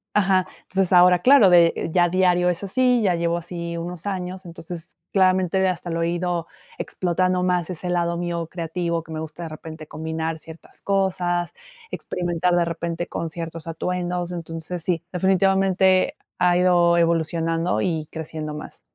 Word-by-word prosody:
ajá. 190 -3 +3
Entonces, 190 -1 0
ahora, 180 0 +7
claro, 250 -1 +7
de 170 -2 +4
ya 175 -1 +4
diario 180 0 +3
es 180 +2 -2
así, 250 +4 +2
ya 190 -4 +2
llevo 170 0 0
así 170 0 -5
unos 170 +1 -6
años. 185 -1 -4
Entonces, 170 0 -8 0.2
claramente, 190 -1 +3
hasta 180 -1 -3
lo 165 0 -1
he - - +1
ido 175 -1 -2 0.3
explotando 185 0 0
más, 180 -2 0
ese 180 +1 -5
lado 170 -1 0
mío 170 -1 -3
creativo, 170 0 -3
que 160 - -13
me 155 - -4
gusta, 160 +2 -7
de 165 - -5
repente, 155 0 -9
combinar 160 +1 -3
ciertas 160 +1 -12
cosas, 180 -3 0 0.4
experimentar, 175 0 -1
de 175 - +3
repente, 170 0 -3
con 165 - -4
ciertos 165 0 -7
atuendos. 175 +1 -2
Entonces, 165 0 -5
sí, 170 -1 -1
definitivamente, 190 0 +3 0.2
ha 180 -1 +4
ido 175 -1 +4
evolucionando 165 0 +1
y 160 -4 -1
creciendo 155 -1 -5
más. 150 - -9
175 Hz, 155 wpm, -23 LUFS, 165-185 Hz, 0.4 s, ahora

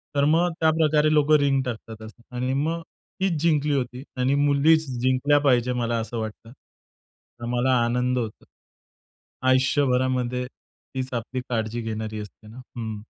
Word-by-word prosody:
तर 140 - +3
मग 165 +4 +3
त्याप्रकारे 155 -1 +3
लोक 150 0 +3
रिंग 135 -1 +2
टाकतात 115 -3 -7
असं. 110 +2 -14
आणि 125 +2 -1
मग 160 +4 -1 0.4
तीच 190 -2 +1
जिंकली 150 -3 +2
होती 125 0 -3
आणि 130 +2 +2
मुलीच 155 +3 +4 0.2
जिंकल्या 130 +3 +3
पाहिजे 125 -3 +2
मला 120 -1 -1
असं 115 +1 -5
वाटतं. 110 +1 -7
तर 120 -2 -18
मला 125 +2 +1
आनंद 125 +1 0
होतो. 110 -3 -4 1.0
आयुष्यभरामध्ये 130 -2 +1
तीच 130 0 -9
आपली 125 +2 -3
काळजी 115 0 -2
घेणारी 110 -1 -4
असते 105 +1 -11
ना. 110 +3 -12 0.2
हं. 110 -2 -5
130 Hz, 140 wpm, -24 LUFS, 120-145 Hz, 1.0 s, मुलीच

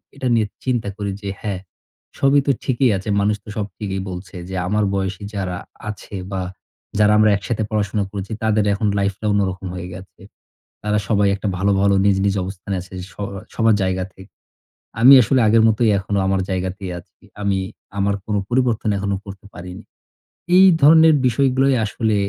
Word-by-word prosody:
এটা 135 -2 -3
নিয়ে 110 -2 +2 0.2
চিন্তা 120 -5 -1
করি। 100 -2 -3
যে, 100 - -4
"হ্যাঁ, 100 -3 -3 0.6
সবই 140 +1 +4
তো - - +5
ঠিকই 130 0 +2
আছে। 95 +3 -6
মানুষ 105 +1 +2
তো - - -26
সব 105 - -1
ঠিকই 95 -2 -3
বলছে 90 +2 -8
যে, 95 - -5
আমার 105 +2 +1
বয়সী 95 0 -3
যারা 90 -3 -3 0.3
আছে 105 -1 -8 0.2
বা 95 - -2 0.6
যারা 105 0 +5
আমরা 110 0 +5
একসাথে 110 +1 -3
পড়াশোনা 105 -1 0
করেছি 100 0 -6
তাদের 110 -1 +2
এখন 105 +1 -1
লাইফটা 100 +2 -2
অন্যরকম 95 -2 -1
হয়ে 90 0 -6
গেছে। 95 +1 -12 0.6
তারা 105 0 +1
সবাই 100 -2 +3
একটা 100 - -3
ভালো, 100 +2 +2
ভালো 100 0 +3
নিজ, 100 -1 +4
নিজ, 100 - +2
অবস্থানে 95 +1 -6
আছে 95 +1 -13 0.2
স - - -20 0.4
সবার 115 -2 +3
জায়গা 95 0 0
থেকে। 95 +1 -15 0.7
আমি 130 +4 +9
আসলে 130 +4 +2
আগের 110 +1 +5
মতই 110 +1 +2
এখনো 100 +1 -2
আমার 95 0 +1
জায়গাতেই 95 +1 -3
আছি। - - -18 0.2
আমি 100 -1 +1 0.4
আমার 100 +1 +1
কোন 105 - -2
পরিবর্তন 120 -4 +1
এখনও 100 0 -1
করতে 100 0 -10
পারিনি।" 90 +1 -9 0.7
এই 190 - +8 0.2
ধরনের 160 +2 +7
বিষয়গুলোই 135 +2 +2
আসলে 110 0 -1
100 Hz, 170 wpm, -20 LUFS, 95-110 Hz, 0.7 s, আমি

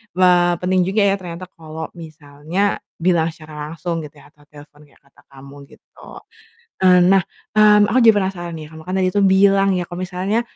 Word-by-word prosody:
eee, 180 -1 +4
penting 185 0 +1
juga 205 +2 0
ya 200 0 +2
ternyata 180 0 -8
kalau 160 -1 -8
misalnya 155 +4 -4 0.2
bilang 170 -1 +1
secara 155 -2 -9
langsung 170 0 -4
gitu 145 - -24
ya, 145 - -20
atau 145 -1 -26
telepon 150 0 -17
kayak 140 - -28
kata 140 - -25
kamu 140 0 -14
gitu. - - -22 0.8
Eee, 185 -1 +5
nah, 195 +1 +4 0.3
mmm, 210 -1 +5
aku - - +2
jadi - - +6
penasaran 180 -3 -3
nih, 155 - -9
kamu 160 - -11
kan - - -3
tadi 185 -1 +1
tuh 205 - +1
bilang 195 0 +4
ya 175 - -3
kalau 175 +1 -8
misalnya, 185 +5 -2
175 Hz, 190 wpm, -19 LUFS, 155-190 Hz, 0.8 s, jadi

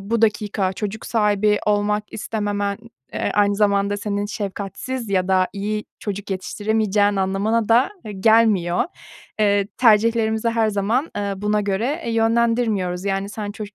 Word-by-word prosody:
bu 225 +3 -1
dakika 210 -3 +1
çocuk 210 +2 -5
sahibi 210 -2 +2
olmak 210 0 +1
istememen, 205 -1 -2 0.3
eee, - - -1
aynı 205 -1 +3
zamanda 200 -1 +2
senin 205 0 -2
şefkatsiz 205 +4 -5
ya 185 -1 +1
da 185 -1 +3
iyi 210 +1 -3
çocuk 205 -1 -5
yetiştiremeyeceğin 205 +1 0
anlamına 200 +4 0
da, 235 +3 +4 0.2
eee, 215 - -6
gelmiyor. 200 -4 +3 0.6
Eee, 200 -1 +3
tercihlerimizi 225 -1 +3
her 230 -1 +1
zaman, 215 +8 0
eee, 200 -1 -1
buna 210 +2 0
göre, 215 - -1
eee, 235 - -2
yönlendirmiyoruz. 225 -5 +1
Yani, 195 0 -1
sen 205 0 -5
çocuk 210 -1 -8
210 Hz, 140 wpm, -21 LUFS, 200-220 Hz, 0.6 s, da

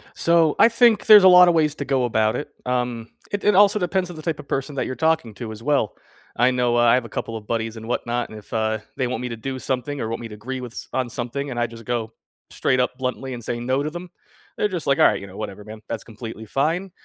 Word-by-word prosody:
So, 165 -2 +3
I 230 - +7
think 230 -2 +4
there's 210 -3 +9
a - - +9
lot 180 0 +8
of 175 - +4
ways 155 -2 +2
to 140 - -5
go 135 -2 +1
about 110 -2 +1
it. 150 - -4 0.2
Um, 125 -2 -2 0.2
it 205 - -3
it 210 -2 +4
also 205 +1 +5
depends 180 0 -1
on 175 - -8
the 155 - -8
type 160 -1 -3
of - - -10
person 135 +2 -3
that 135 - -1
you're 130 - -4
talking 160 -8 +1
to 115 -1 -6
as 110 +1 -9
well. 140 -7 +1 0.4
I 120 +2 +3
know, 125 -1 +1
uh, - - +4
I 120 -1 +5
have 125 -2 +2
a - - -9
couple 115 - -5
of 105 -2 -8
buddies, 115 -1 -2
and 110 +1 -9
whatnot, 120 0 -2
and 110 - -10
if, 105 - -15
uh, 110 0 0 0.2
they 130 - -1
want 125 - -3
me 125 - -4
to 115 - -6
do 130 +3 -5
something, 130 +3 -3
or 110 - -2
want 115 - -4
me 115 - -6
to 105 - -9
agree 130 +5 -6
with 120 -2 -8
s - - -8
on 130 -2 -1
something, 130 +4 -4
and 120 -2 -4
I 120 - +1
just 115 -1 -12
go 115 -2 -3 0.4
straight 130 - 0
up 125 0 0
bluntly, 130 0 -3
and 120 -2 -7
say 120 +1 -3
no 130 +3 0
to 150 - -2
them, 175 +2 -8 0.5
they're - - +2
just 180 -5 -5
like, 140 -1 +2
"Alright, - - +4
you 100 - -8
know, 95 - -12
whatever, 105 -1 -6
man, 110 0 -10
that's 115 -2 -4
completely 110 -1 -9
fine," 165 - -1
125 Hz, 280 wpm, -22 LUFS, 115-150 Hz, 0.5 s, there's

